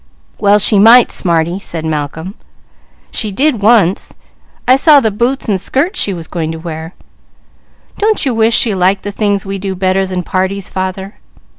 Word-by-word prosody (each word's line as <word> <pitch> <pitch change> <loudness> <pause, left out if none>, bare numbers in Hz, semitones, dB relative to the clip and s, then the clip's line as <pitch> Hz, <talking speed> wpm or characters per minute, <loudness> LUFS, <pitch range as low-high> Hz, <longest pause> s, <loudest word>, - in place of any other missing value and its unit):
"Well 205 0 +4
she 210 0 +4
might, 235 +4 +6
smarty," 170 0 -1
said 165 -4 -6
Malcolm. 160 +4 -4 0.8
"She 215 -3 -1
did 260 +1 0
once! 205 -4 +2 0.5
I 255 - +6
saw 290 +1 +5
the 220 -5 0
boots 240 +6 -2
and 195 -4 0
skirt 295 - -1
she 200 - 0
was 170 -4 -7
going 160 -2 -4
to - - -7
wear. 160 0 -8 1.0
Don't 430 -5 0
you 260 - 0
wish 225 0 +2
she 225 - +1
liked 190 +1 0
the 205 - -4
things 205 -1 -1
we 195 0 -5
do 195 0 -4
better 190 +1 0
than 185 -1 -4
parties, 190 +2 -3
father?" 190 +1 -5
195 Hz, 170 wpm, -13 LUFS, 180-225 Hz, 1.0 s, might